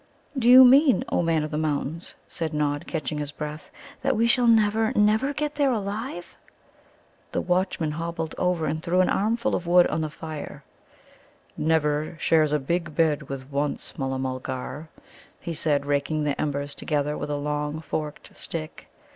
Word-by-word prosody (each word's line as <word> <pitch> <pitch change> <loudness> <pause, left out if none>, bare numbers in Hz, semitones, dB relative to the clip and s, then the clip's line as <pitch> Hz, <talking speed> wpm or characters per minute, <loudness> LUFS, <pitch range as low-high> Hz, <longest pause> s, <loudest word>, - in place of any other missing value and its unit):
"Do 245 -3 +2
you 255 +1 +10
mean, 270 +1 +6
O - - +1
Man 165 -2 +1
of 155 - -5
the 150 - -1
Mountains," 155 +2 -3
said 160 -2 -4
Nod, 145 -1 -1
catching 150 -2 -3
his 145 -1 -3
breath, 150 +1 -7 0.3
"that 270 0 +1
we 230 - +3
shall 240 +1 +4
never, 220 0 +3
never 215 +6 +3
get 295 +1 -2
there 285 -2 +2
alive?" 210 -2 -4 1.0
The - - 0
watchman 180 -3 0
hobbled 165 0 -4
over 180 -3 +1
and 155 +1 -2
threw 180 +2 +2
an 185 - +2
armful 225 +4 0
of 175 - -2
wood 175 0 +6
on 160 - -1
to 155 - -1
the - - -8
fire. 155 -1 -8 0.9
"'Never' 155 0 0
shares 155 -2 +3
a 150 - +3
big 165 +2 -2
bed 150 -4 +1
with 135 0 -7
'Once,' 145 +1 -3
Mulla 135 -1 -2
mulgar," 130 +3 -5 0.5
he 170 - -5
said, 150 -2 0
raking 145 +2 0
the 145 -1 -1
embers 145 -1 -2
together 150 -1 -1
with - - -5
a 145 - -1
long 150 +1 -2
forked 155 -2 -5
stick. 155 -2 -6
155 Hz, 170 wpm, -25 LUFS, 150-185 Hz, 1.0 s, you